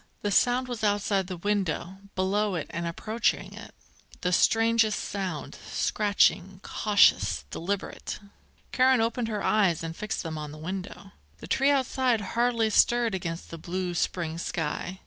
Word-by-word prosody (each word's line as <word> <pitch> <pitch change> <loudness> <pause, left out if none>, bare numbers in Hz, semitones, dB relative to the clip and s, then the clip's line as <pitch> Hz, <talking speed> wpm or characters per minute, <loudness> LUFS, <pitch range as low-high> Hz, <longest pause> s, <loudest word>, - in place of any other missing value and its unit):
The 205 - 0
sound 245 +5 +3
was 240 -3 -5
outside 205 -2 +1
the 185 -1 -5
window, 190 -1 -1 0.2
below 200 +1 +1
it 165 - -2
and 170 0 -3
approaching 215 +7 -1
it, - - -11 0.5
the 180 0 0
strangest 225 +1 +3
sound, 185 -7 -4
scratching, 195 -2 +1
cautious, 205 - +3
deliberate. 195 - -4 0.5
Karen 260 -1 +4
opened 230 +1 0
her 210 -2 -3
eyes 190 -7 +2
and 165 0 -5
fixed 210 +2 -4
them 160 -2 -5
on 150 -1 -6
the 155 - -10
window. 190 +4 -6 0.3
The - - -10
tree 270 +1 +2
outside 260 -3 +2
hardly 235 -2 +2
stirred 235 0 +3
against 170 -2 -4
the 165 - -7
blue 180 +2 -3
spring 170 -1 -2
sky. 170 +2 -3
200 Hz, 145 wpm, -27 LUFS, 175-225 Hz, 0.5 s, Karen